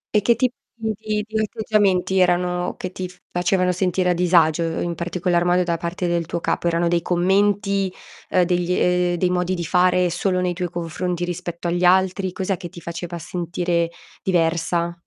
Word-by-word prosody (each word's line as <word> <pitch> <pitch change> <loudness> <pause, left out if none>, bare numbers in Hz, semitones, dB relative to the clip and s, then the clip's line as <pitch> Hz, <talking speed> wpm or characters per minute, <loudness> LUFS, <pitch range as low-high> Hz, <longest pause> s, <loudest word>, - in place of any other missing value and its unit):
E 210 - +5
che 235 +3 +3
tip 250 +1 +1 0.2
di 220 -1 -2
di 210 0 -3
di 220 0 -2
atteggiamenti 205 -4 +1
erano 180 0 +1
che 185 - -5
ti 185 0 -5
f 180 - -17
facevano 180 +1 +1
sentire 180 0 +1
a - - +3
disagio, 170 -2 +3 0.2
in 175 - -2
particolar 175 +1 0
modo 180 +1 +3
da 170 -1 -1
parte 170 +2 -3
del 170 -1 0
tuo 170 - -2
capo? 170 - -1
Erano 170 0 +1
dei 170 0 +2
commenti, 195 +2 +1 0.4
ehm, 180 -1 +3
degli 180 0 0
ehm, 180 -1 +2
dei 180 +1 +1
modi 180 +1 0
di 175 - -3
fare 180 +1 +3
solo 185 +2 0
nei 180 -1 0
tuoi 180 0 -3
confronti 175 +1 -3
rispetto 175 0 -5
agli 175 +1 0
altri? 185 +1 +3
Cos'è 190 0 -2
che 175 - -7
ti 175 -1 -11
faceva 170 +1 -6
sentire 170 0 -1 0.3
diversa? 170 -1 0
180 Hz, 185 wpm, -22 LUFS, 175-185 Hz, 0.4 s, E